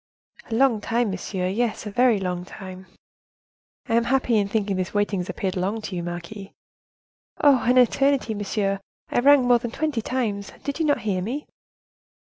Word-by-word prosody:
"A 225 Hz, -, -2 dB
long 245 Hz, -3 st, +3 dB
time, 230 Hz, 0 st, 0 dB
monsieur; 190 Hz, -1 st, -3 dB
yes, 220 Hz, +4 st, -1 dB
a 210 Hz, -, -5 dB
very 245 Hz, -1 st, +3 dB
long 180 Hz, -2 st, -3 dB
time!" 185 Hz, 0 st, -10 dB, 1.0 s
"I -, -, -1 dB
am 235 Hz, 0 st, +3 dB
happy 255 Hz, -2 st, +2 dB
in 200 Hz, -, 0 dB
thinking 200 Hz, -1 st, -1 dB
this 185 Hz, +2 st, -3 dB
waiting 205 Hz, -1 st, +1 dB
has 180 Hz, -, -4 dB
appeared 190 Hz, -2 st, -2 dB
long 195 Hz, +4 st, -1 dB
to 190 Hz, -, -5 dB
you, 175 Hz, -, -2 dB
marquise!" 175 Hz, +4 st, -7 dB, 0.9 s
"Oh! 280 Hz, -4 st, +5 dB
an 250 Hz, +1 st, +4 dB
eternity, 270 Hz, 0 st, +3 dB
monsieur; 200 Hz, -1 st, -1 dB, 0.3 s
oh! -, -, -5 dB
I -, -, +5 dB
rang 275 Hz, 0 st, +5 dB
more 245 Hz, -1 st, +5 dB
than 240 Hz, 0 st, -4 dB
twenty 290 Hz, -1 st, -2 dB
times. 215 Hz, -5 st, -3 dB
Did 280 Hz, +2 st, -4 dB
you 320 Hz, -, +1 dB
not 290 Hz, -1 st, +2 dB
hear 195 Hz, -4 st, -1 dB
me?" 255 Hz, +10 st, -4 dB
215 Hz, 185 wpm, -24 LUFS, 195-250 Hz, 1.0 s, Oh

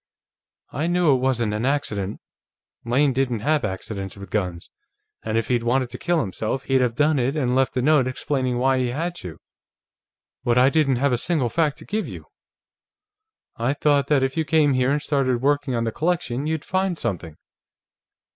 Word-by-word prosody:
I 155 Hz, +4 st, -2 dB
knew 175 Hz, -4 st, +3 dB
it 130 Hz, -, +2 dB
wasn't 120 Hz, -4 st, 0 dB
an 105 Hz, +2 st, -2 dB
accident; 110 Hz, -8 st, -1 dB, 0.6 s
Lane 130 Hz, +4 st, +2 dB
didn't 125 Hz, -4 st, 0 dB
have 150 Hz, +2 st, +1 dB
accidents 95 Hz, 0 st, -5 dB
with 100 Hz, 0 st, -10 dB
guns. 90 Hz, -5 st, -3 dB, 0.5 s
And 110 Hz, -, -2 dB
if 115 Hz, -, 0 dB
he'd 120 Hz, -2 st, +1 dB
wanted 120 Hz, +1 st, 0 dB
to 125 Hz, -, -8 dB
kill 175 Hz, -2 st, +1 dB
himself, 110 Hz, +5 st, -3 dB
he'd 135 Hz, -1 st, +2 dB
have 120 Hz, -2 st, 0 dB
done 150 Hz, +1 st, +2 dB
it 130 Hz, +4 st, 0 dB
and 125 Hz, -5 st, 0 dB
left 130 Hz, 0 st, +1 dB
a 125 Hz, -, +1 dB
note 145 Hz, -3 st, +4 dB
explaining 130 Hz, -1 st, -1 dB
why 130 Hz, +1 st, +2 dB
he 125 Hz, -1 st, 0 dB
had 165 Hz, +8 st, -2 dB
to. 85 Hz, -4 st, -8 dB, 1.1 s
But 120 Hz, 0 st, +1 dB
I 130 Hz, +2 st, +5 dB
didn't 150 Hz, -4 st, +2 dB
have 135 Hz, +2 st, +1 dB
a 120 Hz, -, +1 dB
single 145 Hz, -6 st, 0 dB
fact 150 Hz, +1 st, 0 dB
to -, -, -11 dB
give 215 Hz, +2 st, -2 dB
you. -, -, -9 dB, 1.3 s
I 120 Hz, +4 st, 0 dB
thought 145 Hz, -1 st, +2 dB
that 140 Hz, -3 st, +3 dB
if 135 Hz, 0 st, -1 dB
you 160 Hz, -, +1 dB
came 155 Hz, -2 st, +3 dB
here 130 Hz, 0 st, +2 dB
and 145 Hz, +2 st, +2 dB
started 130 Hz, -4 st, 0 dB
working 145 Hz, -2 st, +1 dB
on 115 Hz, -, 0 dB
the 115 Hz, -, -1 dB
collection, 155 Hz, -3 st, -1 dB
you'd 160 Hz, -1 st, -2 dB
find 185 Hz, -2 st, 0 dB
something." 80 Hz, -, -4 dB
130 Hz, 190 wpm, -23 LUFS, 120-150 Hz, 1.3 s, I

